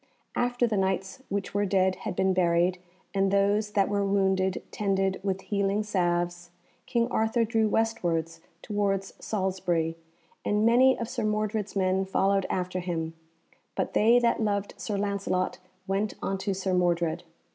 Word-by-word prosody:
After 245 0 +1
the 220 -3 0
Knights 190 +5 -1
which 200 0 -3
were 205 0 +1
dead 190 -1 +2
had - - -5
been 190 +1 +2
buried, 180 0 +2 0.3
and 195 0 +2
those 205 +2 +2
that 200 -1 +3
were 205 0 0
wounded 190 -1 +1
tended 195 -2 0
with 190 -1 -2
healing 200 +1 0
salves, 175 -3 -1 0.4
King 235 -2 +1
Arthur 225 +1 +2
drew 225 -1 +2
westwards 165 -8 0 0.2
towards 200 -2 -1
Salisbury, 180 -5 -1 0.5
and 210 +1 +1
many 255 +3 +5
of 230 - -3
Sir - - -3
Mordred's 215 -1 -1
men 190 0 +2
followed 195 0 +1
after 185 0 -2
him, 165 -2 -3 0.6
but - - -2
they 230 +3 +5
that 235 -1 +2
loved 205 -2 -1
Sir 210 -3 -3
Lancelot 200 -2 -1 0.3
went 200 +2 -1
unto 195 0 -2
Sir 190 0 -1
Mordred. 175 -2 +1
195 Hz, 145 wpm, -27 LUFS, 185-210 Hz, 0.6 s, many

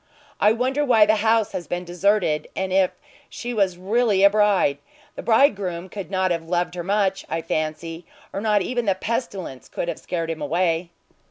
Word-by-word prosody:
I 210 - +5
wonder 260 +5 0
why 230 -6 +5
the 215 +1 +3
house 220 0 +2
has 175 - -5
been 175 0 -3
deserted, 175 -3 +1
and 190 -1 -2
if 190 -1 +4 0.4
she 245 0 -5
was 195 -5 +1
really 205 +1 +2
a 200 - +7
bride. 205 -9 +3 0.4
The - - -6
bridegroom 195 -7 +2
could 195 -2 -7
not 185 -1 0
have 165 -1 -3
loved 175 0 0
her 175 -1 -5
much, 195 0 0
I 165 +1 -2
fancy, 165 +1 -3 0.3
or 195 - -3
not 210 -2 +2
even 245 -1 -2
the 195 -2 +2
pestilence 190 - -4
could - - -4
have - - -4
scared 165 -2 -3
him 160 -1 -6
away." 170 +2 0
190 Hz, 185 wpm, -23 LUFS, 170-210 Hz, 0.4 s, a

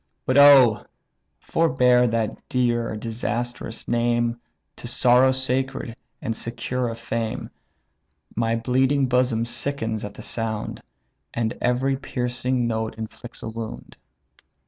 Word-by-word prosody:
But, 130 - +1
oh! 135 -6 +7 0.5
forbear 125 -6 +3
that 115 -2 -2
dear 120 -3 0
disastrous 115 +1 -4
name, 120 0 +1 0.4
To - - -7
sorrow 125 +2 +5
sacred, 130 -2 -2 0.3
and 115 - -2
secure 120 +2 -2
of 115 - -6
fame; 115 -1 -4 0.8
My 115 0 +1
bleeding 130 +4 +2
bosom 125 -2 +1
sickens 120 -2 -2
at 105 0 -7
the - - -9
sound, 110 -2 -3 0.5
And 115 0 -1
every 130 +2 +1
piercing 125 -1 -1
note 110 -1 -2
inflicts 110 +2 -8
a - - -4
wound." 110 - -7
120 Hz, 115 wpm, -24 LUFS, 115-125 Hz, 0.8 s, oh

